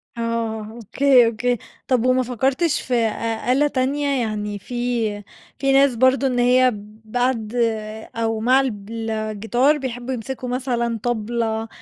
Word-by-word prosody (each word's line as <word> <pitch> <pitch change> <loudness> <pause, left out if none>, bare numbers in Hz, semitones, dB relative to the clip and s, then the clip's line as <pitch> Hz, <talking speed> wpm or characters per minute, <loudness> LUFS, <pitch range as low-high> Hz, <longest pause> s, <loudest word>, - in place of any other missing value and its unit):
آه، 230 -2 -2
أوكي، 245 +3 +3
أوكي، 240 +2 0 0.3
طَب 250 -2 +2
وما 255 0 +3
فكَّرتش 265 +6 0
في 255 - -4
أ 230 -2 +3 0.4
أ - - +4
آلة 290 +3 +3
تانية؟ 275 0 0
يعني 210 -2 -3
في 235 -2 -2 0.4
في 275 0 +2
ناس 275 -2 +4
برضه 260 +3 +3
إن 250 -1 0
هي 250 +1 +4 0.3
بعد 240 -1 -1 0.6
أو 225 -1 -1
مع 250 +4 +4
الجيتار 225 +3 -1
بيحبُّوا 255 -2 -4
يمسكوا 250 +1 -5
مثلًا 240 -3 -1
طبلة، 225 -1 -1
245 Hz, 130 wpm, -21 LUFS, 225-260 Hz, 0.6 s, أ